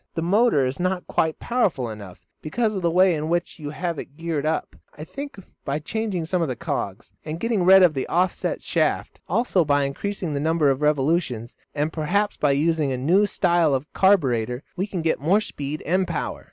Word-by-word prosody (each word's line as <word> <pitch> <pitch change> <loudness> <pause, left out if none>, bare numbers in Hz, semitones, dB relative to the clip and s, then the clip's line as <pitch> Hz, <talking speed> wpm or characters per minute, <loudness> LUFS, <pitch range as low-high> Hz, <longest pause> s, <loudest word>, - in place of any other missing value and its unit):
"The 165 - -1
motor 195 - +3
is 130 +5 -3
not 185 0 -1
quite 160 -1 0
powerful 185 - 0
enough 100 -5 -10 0.2
because 215 +7 -1
of 190 - -2
the 170 - +2
way 185 +2 +4
in 155 0 -3
which 175 0 -1
you 145 -2 -5
have 170 0 -3
it 145 - -10
geared 160 -3 -2
up. 160 - -2 0.2
I 150 - -7
think 280 - -8 0.3
by 140 +1 -1
changing 190 +1 -3
some 180 +2 0
of 165 - +1
the 130 - -3
cogs, 120 - -4
and 155 +1 -5
getting 225 -2 0
rid 190 +1 +8
of 175 -3 +5
the 135 - -3
off 180 +2 +2
set - - -3
shaft, - - -1
also 230 -7 +2
by 145 -2 +2
increasing 170 +4 -3
the 140 - -1
number 155 -1 +2
of 135 +1 -2
revolutions, 145 -5 0 0.2
and 150 +2 -1
perhaps 200 +7 0
by 145 -2 +2
using 155 0 +1
a 130 - -1
new 180 +11 +3
style 170 -7 +2
of 135 +3 -5
carburetor, 130 - +2
we 190 +2 -2
can 180 -5 -4
get 160 -4 0
more 180 +8 +3
speed 150 -7 -5
and 185 +2 +1
power." - - -3
160 Hz, 205 wpm, -23 LUFS, 145-185 Hz, 0.3 s, rid